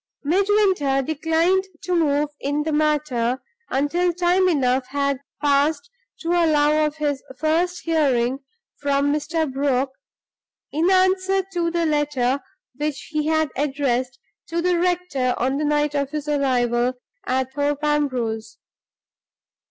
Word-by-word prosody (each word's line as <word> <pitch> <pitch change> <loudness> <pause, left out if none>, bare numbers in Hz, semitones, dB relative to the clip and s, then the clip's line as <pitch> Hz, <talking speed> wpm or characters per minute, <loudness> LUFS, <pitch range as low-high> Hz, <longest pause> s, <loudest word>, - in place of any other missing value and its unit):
Midwinter 370 -5 +2
declined 325 +6 +1 0.2
to 365 - -2
move 295 -3 +2
in 290 +2 -1
the 315 - -2
matter 295 -5 +1 0.3
until 335 +7 +1
time 360 +2 +2
enough 260 -5 +1
had 280 -1 -1 0.2
passed 285 0 +1 0.3
to 330 - -4
allow 310 -3 +3
of 300 - -6
his 290 -3 -1 0.2
first 335 +4 0
hearing 270 -6 +1 0.4
from 285 0 +1
Mr. 310 -1 -1
Brock, 270 -1 0 0.8
in 325 +5 +1
answer 375 0 +3
to 340 -1 0
the 340 0 0
letter 290 -4 +1 0.4
which 300 -1 -3
he 305 -1 -1
had 315 -2 +1
addressed 265 -3 -1 0.3
to 335 0 -2
the 350 0 +1
rector 350 -8 0
on 265 +3 0
the 300 - -1
night 295 0 +1
of 280 -2 -1
his 300 0 -5
arrival 250 -4 +1 0.3
at 260 0 -1
Thorpe 290 +1 -1
Ambrose. 245 -7 -1
295 Hz, 130 wpm, -22 LUFS, 270-330 Hz, 0.8 s, allow